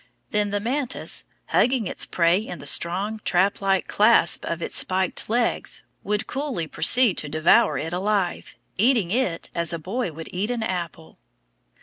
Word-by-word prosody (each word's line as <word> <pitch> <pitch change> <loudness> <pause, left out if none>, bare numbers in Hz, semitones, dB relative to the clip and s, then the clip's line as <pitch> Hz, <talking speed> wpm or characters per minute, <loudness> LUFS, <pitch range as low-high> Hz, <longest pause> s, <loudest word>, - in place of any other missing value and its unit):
Then 210 -1 +1
the 205 0 -1
mantis, 250 +4 -2 0.2
hugging 250 -3 +2
its - - -2
prey 170 +1 +2
in 210 -5 -7
the 140 - -11
strong 195 +9 +2
trap 190 +3 +1
like 195 -1 +1
clasp 210 -4 +3
of 170 - -3
its - - -4
spiked 185 +1 +1
legs, 235 +1 -1 0.2
would 210 +1 -1
coolly 270 - -3
proceed 240 +6 +3
to 150 - -6
devour 165 +9 +3
it 165 +2 -4
alive, 195 -1 -1 0.2
eating 225 -5 +3
it 205 -8 -1
as 170 -1 -2
a - - -2
boy 190 +5 -3
would 160 +1 -9
eat 195 +5 -2
an 240 -2 -2
apple. 170 -5 -5
195 Hz, 160 wpm, -23 LUFS, 170-230 Hz, 0.2 s, clasp